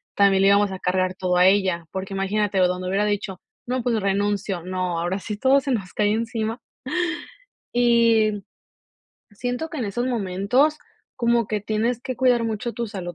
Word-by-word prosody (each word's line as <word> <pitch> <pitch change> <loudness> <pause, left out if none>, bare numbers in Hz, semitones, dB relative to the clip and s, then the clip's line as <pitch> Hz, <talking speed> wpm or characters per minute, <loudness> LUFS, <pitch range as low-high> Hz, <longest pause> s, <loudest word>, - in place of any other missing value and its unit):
también 195 -1 +4
le - - +5
íbamos 200 0 +4
a 190 - -6
cargar 185 0 0
todo 180 -1 0
a 180 - +5
ella, 190 -4 +2
porque 190 +1 -5
imagínate, 200 +1 0
donde 180 0 +1
hubiera 200 +2 +1
dicho: 200 -3 -2 0.3
"No, 255 0 -1
pues, 230 -3 +1
renuncio", 200 -1 -1
no, 180 -2 -2
ahora 175 +3 -1
sí 210 +2 -5
todo 270 +4 +4
se 270 - -3
nos 195 -7 -2
cae 210 -1 +1
encima. 225 +1 -2 1.1
Y 230 -4 +3 0.9
siento 245 +9 -4
que 315 - -5
en 235 - -2
esos 240 +5 -2
momentos 230 +6 +1 0.4
como 235 -2 +2
que 210 -1 -1
tienes 220 +3 -1
que 255 - -4
cuidar 245 -2 +3
mucho 225 +1 -3
tu 235 0 -3
salud 180 -4 -6
205 Hz, 175 wpm, -23 LUFS, 190-235 Hz, 1.1 s, le